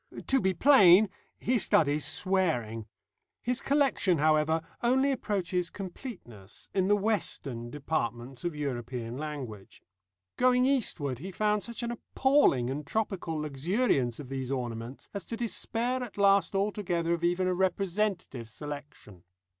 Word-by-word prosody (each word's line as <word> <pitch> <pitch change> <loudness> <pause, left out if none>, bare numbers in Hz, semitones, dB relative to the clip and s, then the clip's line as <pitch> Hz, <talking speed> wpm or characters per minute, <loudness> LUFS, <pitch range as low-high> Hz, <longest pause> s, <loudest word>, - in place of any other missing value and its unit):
To 270 -1 +2
be 190 -1 +1
plain, 205 - +7 0.3
he 245 0 +1
studies 150 -5 +2
swearing. 145 - 0 0.6
His 250 +1 -1
collection, 270 - +2
however, 155 +1 +2 0.2
only 265 +3 +3
approaches 185 -8 -1
completeness 175 - -9
in 190 -1 +2
the 205 - +5
western 170 - -2
departments 130 -3 -3
of 175 -3 -2
European 125 -4 -4
language. 135 -9 -7 0.5
Going 250 0 +4
eastward 170 - 0
he 190 +6 -6
found 210 +2 +1
such 235 +1 -6
an 235 - -2
appalling 240 - +2
and 145 +3 -4
tropical 195 -7 -2
luxuriance 150 - 0
of 140 -4 -8
these 135 -1 -4
ornaments 120 -1 -5
as 200 -3 -4
to 230 - -5
despair 240 +2 -1
at 245 -4 -7
last 200 0 +4
altogether 190 -4 0
of 170 0 -3
even 175 +2 +2
a 185 - +1
representative 185 - -1
selection. 145 - -9
175 Hz, 130 wpm, -29 LUFS, 135-210 Hz, 0.6 s, plain